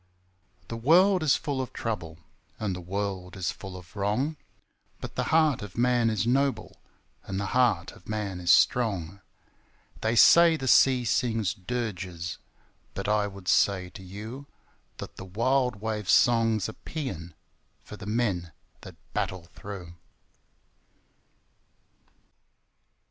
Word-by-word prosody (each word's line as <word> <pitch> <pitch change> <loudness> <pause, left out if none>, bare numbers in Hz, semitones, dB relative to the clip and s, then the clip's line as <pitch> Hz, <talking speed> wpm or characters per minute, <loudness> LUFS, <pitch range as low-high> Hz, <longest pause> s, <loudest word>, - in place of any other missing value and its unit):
The 115 - -5
world 180 - +5
is 155 -3 +4
full 145 -4 -2
of 130 - -6
trouble, 85 -9 -4 0.4
And 100 -4 -2
the 90 - -6
world 95 0 -4
is 90 - -1
full 95 -1 -9
of 90 +1 -14
wrong, 110 +10 0 0.6
But - - -7
the - - -2
heart 155 -4 +3
of 105 -1 -9
man 120 -1 +3
is 110 -2 0
noble, 135 +3 0 0.4
And 95 0 -3
the 100 - -2
heart 120 -9 +2
of 90 - -17
man 105 -4 -3
is 90 0 +2
strong! 100 -6 +2 0.8
They 110 +1 +1
say 170 +6 +7
the 135 -3 -4
sea 130 0 +5
sings 115 -3 0
dirges, 95 -5 -4 0.6
But 100 - -4
I 105 -1 +2
would 100 -2 -11
say 95 -3 +2
to - - -11
you 110 +9 -8 0.5
That - - -9
the - - -8
wild 120 +3 0
wave's 105 -3 0
song's 115 -3 +3
a 110 - -7
paean 90 - -6 0.5
For - - -10
the 105 - -10
men 100 -8 -1 0.3
that - - -11 0.2
battle 90 -2 -3
through. 95 -4 -8
105 Hz, 135 wpm, -27 LUFS, 95-125 Hz, 0.8 s, say